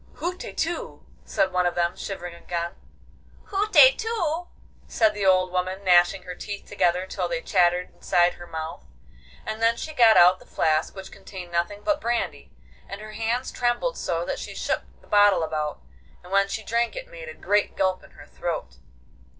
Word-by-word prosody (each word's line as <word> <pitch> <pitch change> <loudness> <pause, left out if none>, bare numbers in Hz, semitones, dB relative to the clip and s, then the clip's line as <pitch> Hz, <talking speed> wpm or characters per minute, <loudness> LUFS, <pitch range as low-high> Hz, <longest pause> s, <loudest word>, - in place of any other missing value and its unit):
'Hutetu!' 345 -1 -4 0.2
said 190 - +1
one 180 -1 +2
of 175 - -2
them, 175 0 0
shivering 175 -3 -6
again. 170 0 -4 0.8
'Hutetu!' 415 -5 +3 0.4
said 220 -2 +2
the 205 -2 -1
old 185 -1 +4
woman, 185 +2 -2
gnashing 180 0 +4
her 180 - -7
teeth 200 +3 -7
together 180 -2 +1
till 185 -1 -3
they 170 -1 -2
chattered 180 0 +1
inside 175 0 +2
her 175 - -12
mouth; 160 -1 -6 0.6
and 220 +1 -5
then 230 0 +4
she 310 - -6
got 230 -5 +6
out 180 +1 +7
the - - -17
flask 155 +3 0
which 190 -1 -9
contained 180 -3 -10
nothing 175 +5 -2
but 305 -1 +1
brandy, 235 -2 -2 0.4
and 200 - -6
her 215 0 -9
hands 230 +4 -2
trembled 245 - 0
so - - -2
that - - -3
she - - -7
shook - - -1 0.2
the - - -22
bottle 205 -4 +5
about, 155 -2 -3 0.4
and 180 - -14
when 195 0 +3
she 220 +2 -4
drank 235 +2 0
it - - -6
made - - -9
a 480 - -9
great 205 0 0
gulp 185 -1 0
in - - -16
her - - -15
throat. 65 0 -5
195 Hz, 175 wpm, -25 LUFS, 175-235 Hz, 0.8 s, out